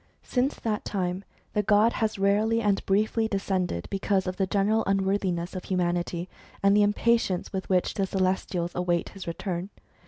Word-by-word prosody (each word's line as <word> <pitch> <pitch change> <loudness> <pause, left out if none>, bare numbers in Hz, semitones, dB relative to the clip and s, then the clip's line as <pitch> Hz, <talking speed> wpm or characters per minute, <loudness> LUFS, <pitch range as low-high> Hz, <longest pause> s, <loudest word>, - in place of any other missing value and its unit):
Since 260 +3 0
that 215 -2 -1
time 185 -1 -2 0.3
the 210 - +2
god 210 +3 +4
has 220 -2 -1
rarely 210 +3 +2
and 205 -3 +1
briefly 215 +3 +2
de 200 - -1
scended, 185 - -2
because 195 -1 0
of 185 0 -3
the 190 - +1
general 210 +3 +2
unworthiness 190 -2 0
of 185 - -5
humanity, 175 -1 -1 0.4
and 200 0 +5
the 210 - +5
impatience 205 -2 +1
with 190 -1 -4
which 185 -2 +2
the 195 -1 -1
celestials 185 -2 -1
await 175 -1 0
his 195 -3 -10
return. 175 +2 -3
195 Hz, 165 wpm, -27 LUFS, 180-210 Hz, 0.4 s, and